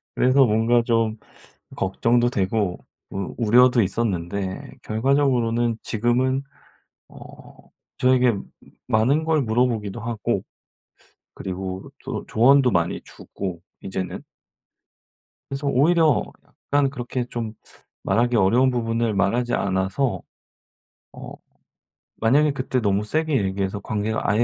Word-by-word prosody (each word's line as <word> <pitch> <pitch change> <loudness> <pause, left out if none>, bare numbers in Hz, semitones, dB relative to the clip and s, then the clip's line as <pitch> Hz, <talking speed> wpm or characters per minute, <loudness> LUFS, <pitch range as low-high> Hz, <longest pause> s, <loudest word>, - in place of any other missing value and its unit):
그래서 130 +2 +4
뭔가 115 +1 +3
좀 115 -2 +1 0.6
걱정도 120 +5 +1
되고 100 -3 -1 0.3
우 95 -1 -5
우려도 120 +2 +5
있었는데 95 -2 -2
결과적으로는 120 -1 +1
지금은 125 +4 0 0.7
어 - - -17 0.8
저에게 125 -1 +4 0.5
많은 125 +7 +2
걸 160 -2 +2
물어 120 +1 +2
보기도 110 -2 -4
하고 115 -2 -2 0.9
그리고 95 0 -6
또 - - -5
조언도 130 +3 +4
많이 85 -3 0
주고 90 -4 -7 0.2
이제는. 95 -1 -5 1.3
그래서 140 +1 -4
오히려 155 +3 +3 0.5
약간 140 -1 +3
그렇게 125 -1 -4
좀 115 -2 -5 0.5
말하기 120 +1 +1
어려운 115 +6 +4
부분을 115 -2 -1
말하지 120 +5 +1
않아서 95 +3 -1 0.9
어 - - -9 0.8
만약에 145 +7 +3
그때 130 -1 -1
너무 100 -1 +1
세게 155 +5 0
얘기해서 95 +1 -2
관계가 110 +2 -2
아예 105 +4 +3
115 Hz, 250 characters per minute, -23 LUFS, 100-130 Hz, 1.3 s, 우려도